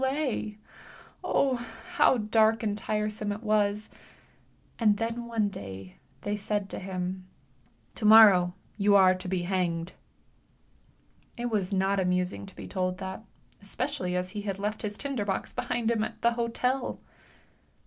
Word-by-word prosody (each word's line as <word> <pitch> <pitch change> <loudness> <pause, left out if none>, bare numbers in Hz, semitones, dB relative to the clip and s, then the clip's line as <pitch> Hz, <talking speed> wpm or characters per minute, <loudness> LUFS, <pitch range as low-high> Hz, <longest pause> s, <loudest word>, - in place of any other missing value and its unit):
Oh. 265 -2 +2 0.3
how 260 - +4
dark 220 +1 +3
and 210 -2 0
tiresome 210 0 -2
it 210 +3 -5
was, 210 -1 +1 0.9
and 210 -3 +4
then 230 +2 -3
one 225 -3 0
dav 95 - -8 0.3
they 205 0 -2
said 205 -1 -2
to - - -4
him 185 0 -4 0.7
7 215 - -1
morrow 195 -5 +8 0.2
you 200 -1 +4
are 190 -1 +7
to 185 0 -6
be 180 -1 -1
hanged." 175 -2 -1 1.4
It 240 0 -3
was 205 -3 0
not 195 0 +1
amusing 180 +1 0
to 195 - -12
be - - -8
told 185 -1 -2
that, 190 +2 -6 0.4
especially 200 -2 -3
as 180 0 -1
he 205 +2 -5
had 200 -2 -3
left 210 +2 -3
his 210 -1 -4
trader 275 -6 -2
box 195 -2 -3
behind 240 -2 -1
him 220 -2 +1
at - - -6
the 235 - +5
hotel. 245 +2 -1
205 Hz, 145 wpm, -28 LUFS, 185-225 Hz, 1.4 s, morrow